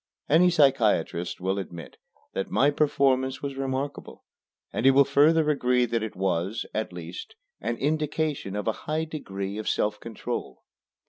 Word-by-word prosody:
Any 170 +4 +5
psychiatrist 115 - +2
will 95 +2 -1
admit 85 -4 -8 0.4
that 95 - -3
my 140 +2 +3
performance 135 -3 +1
was 140 -1 -3
remarkable, 135 +1 -4 0.5
and - - -2
he 135 - +7
will 135 +1 +6
further 150 +3 +4
agree 125 -3 +2
that 115 -1 -1
it 110 -1 -5
was, 95 +3 -1
at 110 -2 -2
least, 90 - -8 0.2
an 120 - -2
indication 150 -6 -1
of 105 +1 -3
a - - +4 0.2
high 155 +1 0
degree 100 -10 -5
of 110 - -2
self 105 0 0
control. 115 - -6
130 Hz, 150 wpm, -26 LUFS, 100-145 Hz, 0.5 s, he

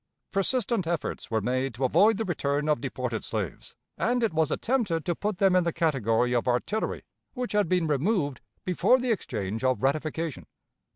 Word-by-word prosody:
Persistent 200 -1 0
efforts 170 -2 -3
were 110 -1 0
made 130 +2 -1
to 130 +3 0
avoid 205 - +4
the 225 - -1
return 145 -4 -1
of 150 -6 +2
deported 125 -4 -3
slaves, 100 -8 -4 0.2
and 245 +1 +1
it 220 - +1
was 160 -1 +2
attempted 205 - 0
to 175 - +1
put 205 +3 -3
them 190 -1 +4
in 180 - +4
the 170 - 0
category 125 -7 +1
of 120 +1 0
artillery 125 - -1 0.3
which 250 -1 -3
had 210 -5 +2
been 180 -2 +2
removed 150 - 0 0.2
before 185 +7 +4
the 255 -1 -1
exchange 110 - -3
of 130 0 +1
ratification. 155 +2 -1
160 Hz, 175 wpm, -27 LUFS, 130-200 Hz, 0.3 s, avoid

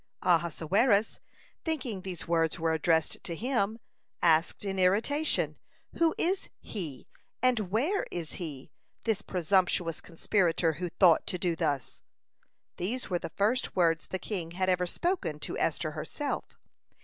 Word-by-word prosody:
(177) 170 0 +1
Ahasuerus, 225 -3 +3 0.4
thinking 255 - -2
these 185 -2 -6
words 165 -2 +2
were 165 0 +1
addressed 160 0 +1
to 170 - -3
him, 225 -1 0 0.5
asked 165 +3 +3
in 195 -1 -2
irritation: 225 +12 +2 0.4
"Who 330 -1 +3
is 370 +3 0
he, 155 - -5 0.4
and 240 -7 +2
where 295 - +1
is 165 -3 -5
he, 145 -6 -6 0.3
this 220 -3 0
presumptuous 180 -3 +1
conspirator, 170 -1 +1
who 175 +3 -4
thought 170 -1 +4
to 180 - -2
do 175 -2 0
thus?" 140 -5 -2 0.8
These 220 +5 -3
were 175 - +1
the - - -5
first 215 +9 0
words 165 -2 +2
the 190 - -2
king 180 -4 -4
had 185 +1 0
ever 180 -1 +2
spoken 355 - -1
to - - -4
Esther - - 0
herself. 290 -2 -4
185 Hz, 140 wpm, -30 LUFS, 165-225 Hz, 0.8 s, thought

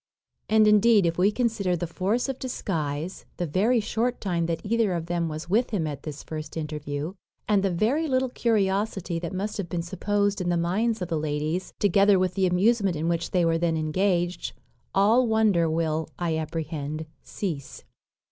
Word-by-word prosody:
And, 215 0 +5
indeed, 210 -1 +5
if 165 +1 0
we 195 +3 +4
consider 215 -6 0
the 175 - -2
force 195 - -1
of 270 -1 -4
disguise, 165 - -3
the 175 - -1
very 210 +10 +2
short 235 +3 -1
time 170 -4 -1
that 165 -1 -1
either 220 -2 +1
of 165 -1 -3
them 170 -1 -1
was 155 +2 -6
with 220 +7 +2
him 195 -7 -1
at 145 -2 -4
this 150 -1 -7
first 155 0 -6
interview, 150 +1 -4 0.3
and 205 -2 +3
the 195 - +1
very 235 - +1
little 260 -2 +1
curiosity 200 -6 0
that 170 +1 -5
must 200 +3 -3
have 190 -4 -4
been 170 0 -2
supposed 200 +3 0
in 175 - -1
the 175 - +2
minds 205 +6 0
of 180 - -5
the 160 - 0
ladies, 155 +4 -2
together 200 0 +4
with 185 -1 +1
the 190 -1 +2
amusement 195 +1 +2
in 160 +2 -1
which 170 0 -1
they 180 -2 +2
were 165 0 +2
then 165 -1 +1
engaged, 175 +3 0 0.4
all 220 +6 +4
wonder 215 -7 +3
will, 160 -1 -1
I 170 -2 -1
apprehend, 155 -1 -4 0.2
cease. 160 -9 -5
180 Hz, 185 wpm, -26 LUFS, 165-210 Hz, 0.4 s, And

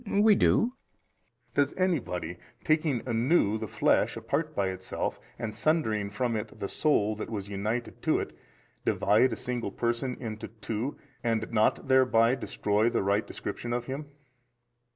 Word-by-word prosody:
B. 200 -2 0
We 215 +1 +7
do. 230 +4 +3 0.8
A. - - -35
Does 145 -1 +3
anybody, 115 - -1 0.2
taking 155 -6 +1
anew 115 -2 +2
the 110 - -4
flesh - - +2
apart - - -2
by 100 -2 +1
itself, 95 0 -3 0.2
and 110 -2 -4
sundering 110 -6 +1
from 115 +3 -1
it 105 0 -5
the 100 - -2
soul 110 -8 +2
that - - -5
was 100 -3 -4
united 110 +4 -3
to - - +2
it, - - -5 0.5
divide 105 +6 +3
a - - -1
single 120 -4 -3
person 120 +3 -1
into 110 -3 -5
two 115 +4 -4 0.3
and 115 -2 0
not 110 +3 +2
thereby 125 -3 +5
destroy 110 -4 +1
the 115 -4 0
right 100 +2 +1
description 120 0 -4
of 120 0 -1
him? 140 +3 -5
115 Hz, 155 wpm, -29 LUFS, 105-130 Hz, 0.8 s, We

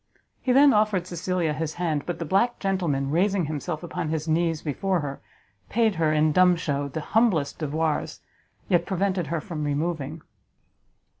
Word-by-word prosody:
He 255 - 0
then 275 +1 +6
offered 210 -4 +2
Cecilia 175 -2 -1
his 155 +1 -3
hand; 160 -5 -2
but 175 - -2
the 165 - -4
black 200 +9 +2
gentleman, 170 -9 -1
raising 190 +2 +2
himself 155 +2 -4
upon 175 -2 -4
his 160 0 -2
knees 165 0 +1
before 180 +4 -1
her, 140 -1 -6 0.5
paid 225 -2 +2
her, 155 -1 +3
in 155 0 +3
dumb 180 +2 +5
shew, 145 -4 -2
the 155 +4 -4
humblest 180 -7 +1
devoirs, 155 0 -1 0.5
yet 175 -2 +2
prevented 190 -3 0
her 165 +2 -1
from 155 -1 -5
removing. 150 +1 -2
165 Hz, 160 wpm, -25 LUFS, 150-185 Hz, 0.5 s, then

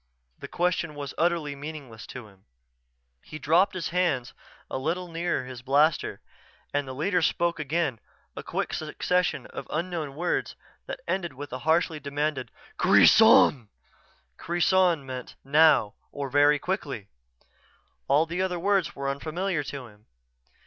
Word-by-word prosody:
The - - -7
question 170 -3 -1
was 140 -2 -6
utterly 165 -4 0
meaningless 140 -6 -9
to 125 -4 -9
him. 95 -2 -22 0.8
He 155 - -9
dropped 165 +7 +3
his 180 - -3
hand 170 -9 0 0.3
a - - -4
little 170 +6 -2
nearer 165 -5 -2
his 125 -1 -8
blaster 145 +4 +2 0.5
as 145 0 0
the 130 -1 -7
leader 180 +5 +1
spoke 170 0 +1
again; 150 -4 -1 0.4
a - - -5
quick - - -3
succession 180 0 -1
of - - -8
unknown 160 -3 -3
words 175 +3 -1 0.3
that - - -6
ended 170 -6 -2
with 140 0 -8
a 130 - -4
harshly 160 -1 +2
demanding 145 -1 -2 0.3
"kreson!" 125 -6 +6 0.7
Kreson 175 -2 +2
meant 130 -1 -7
"now," 145 -6 +4 0.2
or 140 -2 -5
"very 145 +1 +5
quickly." 145 - -4 1.0
All 145 +4 +4
the 170 +3 -3
other 185 -1 -1
words 195 0 +1
were 140 0 -4
unfamiliar 155 +5 -2
to 135 -2 -6
him. 105 -2 -18
150 Hz, 140 wpm, -27 LUFS, 135-175 Hz, 1.0 s, kreson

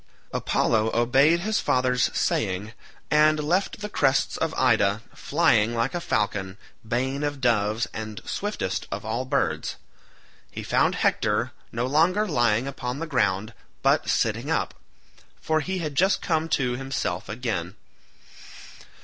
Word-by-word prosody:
Apollo 110 0 +1
obeyed 135 +8 +4
his 215 +3 0
father's 125 -1 +2
saying, 100 +4 -1 0.4
and 155 0 +5
left 180 +7 0
the 210 - -3
crests 135 -9 +1
of - - -1
Ida, 100 +3 +3
flying 130 -8 +2
like 115 +3 0
a 175 - -2
falcon, 105 - -1 0.3
bane 130 +5 -1
of 145 -1 -2
doves 115 -2 +1
and 110 -1 -6
swiftest - - -3
of - - -4
all 115 +4 -2
birds. 80 -10 -1 0.7
He - - -7
found - - +2
Hector - - +1 0.2
no 120 +2 -1
longer 170 +10 +2
lying 120 - +2
upon 125 -2 -4
the 165 - -3
ground, 110 - 0 0.3
but - - +3
sitting - - 0
up, - - 0 0.7
for 155 0 +1
he 185 +5 -3
had 155 -5 -3
just 190 +7 +3
come 160 -1 -1
to 125 -4 +1
himself 125 -8 -3
again. 105 -6 -3
125 Hz, 135 wpm, -25 LUFS, 110-155 Hz, 0.7 s, and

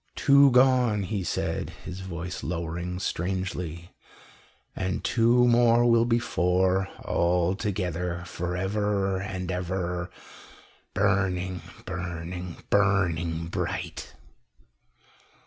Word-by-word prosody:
"Two 140 0 +6
gone," 125 -5 +4
he 95 0 -2
said, - - -2 0.2
his 90 - -6
voice 90 -1 -5
lowering 85 +1 -3
strangely, 90 -2 -3 0.8
"and 95 0 -2
two 120 +1 +4
more 120 0 +5
will 115 -1 +5
be 120 -1 +3
four 95 -3 +1 0.2
all 85 +1 +2
together 90 -3 -2
for 90 0 -4
ever 100 0 0
and 95 -3 -4
ever, 90 -1 -2 0.9
burning, 95 -2 +1 0.2
burning, 90 0 -5
burning 85 -5 +2
bright." - - -4
95 Hz, 95 wpm, -27 LUFS, 90-105 Hz, 0.9 s, Two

